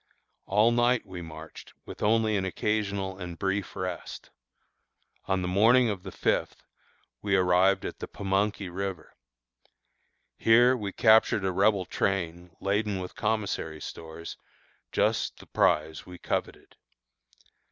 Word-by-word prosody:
All 105 Hz, +4 st, +4 dB
night 120 Hz, +1 st, +2 dB
we 90 Hz, -2 st, -8 dB
marched 80 Hz, -1 st, -11 dB
with -, -, -10 dB
only 110 Hz, 0 st, +2 dB
an 95 Hz, -, 0 dB
occasional 100 Hz, 0 st, -2 dB
and 90 Hz, -2 st, -7 dB
brief 95 Hz, +1 st, -2 dB
rest. 90 Hz, -1 st, -6 dB, 1.0 s
On 95 Hz, -1 st, 0 dB
the -, -, -2 dB
morning 115 Hz, +6 st, +4 dB
of 95 Hz, -3 st, -5 dB
the 95 Hz, 0 st, -8 dB
fifth -, -, -1 dB, 0.6 s
we 100 Hz, -1 st, +1 dB
arrived 95 Hz, +1 st, +3 dB
at -, -, -6 dB
the -, -, -5 dB
Pamunkey 100 Hz, 0 st, -1 dB
River. 95 Hz, -2 st, -5 dB, 1.3 s
Here 120 Hz, +3 st, +5 dB
we 105 Hz, -5 st, -4 dB
captured 110 Hz, -2 st, +4 dB
a 95 Hz, -, +1 dB
Rebel 100 Hz, +1 st, +2 dB
train 90 Hz, -2 st, -2 dB
laden 100 Hz, +1 st, 0 dB
with 90 Hz, -1 st, -6 dB
commissary 105 Hz, -8 st, -2 dB
stores, 80 Hz, +1 st, -8 dB, 0.5 s
just -, -, 0 dB
the -, -, -14 dB
prize 80 Hz, +1 st, +1 dB
we 90 Hz, 0 st, -11 dB
coveted. -, -, -4 dB
95 Hz, 130 wpm, -28 LUFS, 90-105 Hz, 1.3 s, Here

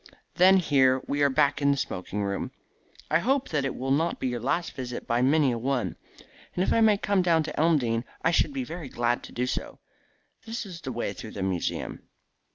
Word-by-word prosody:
Then 190 Hz, +2 st, +6 dB
here 135 Hz, -7 st, +3 dB
we 145 Hz, +1 st, -1 dB
are 140 Hz, -, +5 dB
back 140 Hz, +1 st, +2 dB
in 140 Hz, -, +3 dB
the 140 Hz, -, +2 dB
smoking 100 Hz, -3 st, -3 dB
room. 100 Hz, 0 st, -2 dB, 0.6 s
I 155 Hz, -, +4 dB
hope 265 Hz, +7 st, 0 dB
that 145 Hz, -3 st, 0 dB
it 135 Hz, -, -2 dB
will 135 Hz, +1 st, -3 dB
not 160 Hz, +5 st, +1 dB
be 130 Hz, -, -1 dB
your 120 Hz, -1 st, -3 dB
last 155 Hz, +8 st, -1 dB
visit 125 Hz, -2 st, -6 dB
by 120 Hz, 0 st, +1 dB
many 140 Hz, +1 st, +4 dB
a 120 Hz, -, -2 dB
one. 130 Hz, +1 st, -1 dB, 0.6 s
And 180 Hz, -, +1 dB
if -, -, +1 dB
I 230 Hz, -, +3 dB
may 215 Hz, -2 st, +5 dB
come 200 Hz, -1 st, +1 dB
down 165 Hz, -3 st, +3 dB
to -, -, -6 dB
Elmdene 130 Hz, -8 st, +2 dB, 0.2 s
I 165 Hz, -, +3 dB
should 175 Hz, -, +2 dB
be 270 Hz, -2 st, -3 dB
very 170 Hz, -, -7 dB
glad 120 Hz, 0 st, 0 dB
to -, -, -12 dB
do 125 Hz, -, -1 dB
so. 125 Hz, -, -4 dB, 0.7 s
This 230 Hz, -1 st, -5 dB
is 175 Hz, -4 st, -9 dB
the 130 Hz, -, -5 dB
way 120 Hz, -1 st, -3 dB
through 110 Hz, -, -9 dB
the 100 Hz, -, -4 dB
museum." 95 Hz, -3 st, -2 dB
140 Hz, 220 wpm, -27 LUFS, 125-170 Hz, 0.7 s, Then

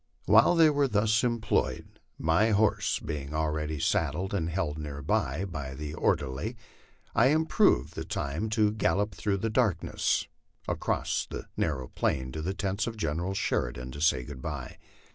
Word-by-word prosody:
While 110 Hz, -, +6 dB
they 160 Hz, -2 st, +6 dB
were 145 Hz, -1 st, +2 dB
thus 110 Hz, 0 st, +2 dB
employed, 115 Hz, -3 st, -1 dB, 0.2 s
my 80 Hz, +8 st, +3 dB
horse 105 Hz, -1 st, +2 dB
being 75 Hz, -2 st, -5 dB
already 75 Hz, -1 st, -1 dB
saddled 95 Hz, +8 st, 0 dB
and 85 Hz, -5 st, 0 dB
held 80 Hz, -3 st, -2 dB
near 70 Hz, -2 st, -6 dB
by, 75 Hz, +5 st, 0 dB
by 70 Hz, -7 st, -6 dB
the 75 Hz, +2 st, -5 dB
or -, -, +3 dB
derly, 70 Hz, -, -5 dB, 0.6 s
I 120 Hz, -, +5 dB
improved 155 Hz, -, +3 dB
the -, -, -4 dB
time 80 Hz, +11 st, -3 dB
to 105 Hz, -1 st, +3 dB
gallop 105 Hz, -1 st, 0 dB
through 100 Hz, +5 st, -1 dB
the 110 Hz, +3 st, -2 dB
darkness 105 Hz, -8 st, +1 dB, 0.4 s
across -, -, -1 dB
the -, -, -6 dB
narrow 65 Hz, -6 st, -1 dB
plain 65 Hz, 0 st, -1 dB
to 80 Hz, -, -5 dB
the 95 Hz, +5 st, -2 dB
tents 100 Hz, +1 st, -1 dB
of 115 Hz, -1 st, -5 dB
General 85 Hz, +2 st, -2 dB
Sheridan, 60 Hz, -5 st, -2 dB
and 70 Hz, -, -7 dB
say 70 Hz, -6 st, +3 dB
good 65 Hz, 0 st, -9 dB
by. -, -, -5 dB
85 Hz, 160 wpm, -29 LUFS, 75-110 Hz, 0.6 s, While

